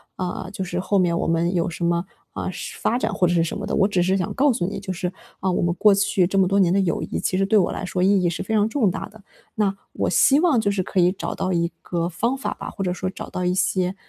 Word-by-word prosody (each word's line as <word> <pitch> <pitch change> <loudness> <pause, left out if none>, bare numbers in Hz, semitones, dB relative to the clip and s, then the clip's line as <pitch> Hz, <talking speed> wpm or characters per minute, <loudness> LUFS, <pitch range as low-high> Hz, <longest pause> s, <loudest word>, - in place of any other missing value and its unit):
啊， 180 -1 -4
就 190 - -4
是 180 -1 -3
后 200 +2 0
面 170 -2 +2
我 - - -1
们 165 +2 +1
有 170 +1 +1
什 170 0 -4
么 170 +1 +1 0.3
啊， - - -3 0.3
发 240 - +1
展 220 - -1
或 185 - +2
者 175 - +1
是 170 -1 +3
什 - - -4
么 - - -5
的。 - - -4
我 195 -1 +4
只 185 -4 +1
是 190 +2 +2
想 180 - -2
告 280 +1 +3
诉 175 - -1
你 200 - -4
就 190 - -5
是， 180 0 -3 0.3
啊， 190 - 0
我 - - 0
们 170 0 +1
过 210 +3 +5
去 195 -2 +2
这 195 +2 -2
么 190 - +4
多 195 +2 +2
年 180 -2 +4
的 200 - +3
友 175 -4 0
谊， - - -4
其 185 - -1
实 195 - +2
对 215 +2 +3
我 185 - +2
来 - - -4
说 180 0 -2
意 195 0 +4
义 175 - +3
是 170 - -4
非 220 - -3
常 210 -1 +3
重 225 -5 +2
大 190 - -5
的。 215 0 -17 0.3
那 205 -3 +1 0.2
我 - - -1
希 280 -1 +5
望 325 -9 +3
就 210 -2 +1
是 195 -2 -1
可 185 - -1
以 175 +1 +5
找 195 - -4
到 185 - -1
一 170 0 0
个 170 -1 -2
方 235 +9 -1
法 270 - -3
吧， - - -7
或 195 - -5
者 180 - 0
说 185 +1 -3
找 185 - -8
到 180 - -3
一 180 - +2
些， 185 0 0
185 Hz, 325 characters per minute, -23 LUFS, 175-200 Hz, 0.3 s, 过